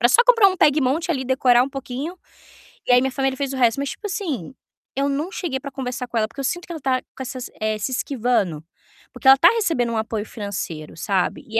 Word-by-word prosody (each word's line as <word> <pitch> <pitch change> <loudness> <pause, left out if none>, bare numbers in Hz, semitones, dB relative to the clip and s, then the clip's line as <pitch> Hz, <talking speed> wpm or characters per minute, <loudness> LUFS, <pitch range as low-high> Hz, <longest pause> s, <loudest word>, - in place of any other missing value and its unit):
Era 240 - +5
só 470 - +6
comprar 460 -5 +6
um 375 - -3
pegue 300 -2 +4
e - - +1
monte 315 +7 0
ali, 265 -5 -1
decorar 250 -1 +4
um - - -5
pouquinho. 275 +5 -5 0.7
E - - +3
aí 245 - +7
minha 265 - 0
família 270 0 -1
fez 275 -1 -2
o - - -4
resto, 240 -1 +3
mas 280 -1 -2
tipo 420 - -6
assim, 315 - -4 0.4
eu 275 +1 +1
não 295 +6 -2
cheguei 320 -11 -3
para 280 - -7
conversar 250 -1 -4
com 235 -1 -4
ela, 215 -1 +2
porque 230 - -13
eu - - -2
sinto 350 +6 -2
que 345 - -7
ela 315 - -7
tá 260 -1 +1
com - - -14
essas, 255 -1 -6
eh, 215 0 0
se 235 +5 -3
esquivando, 235 - 0 0.5
porque 265 - -3
ela 270 0 +9
tá 340 +5 +7
recebendo 330 - 0
um - - -1
apoio 220 -1 -2
financeiro, 190 -9 -6
sabe. 190 +1 -1
E 225 +1 0
260 Hz, 250 wpm, -22 LUFS, 235-285 Hz, 0.7 s, ela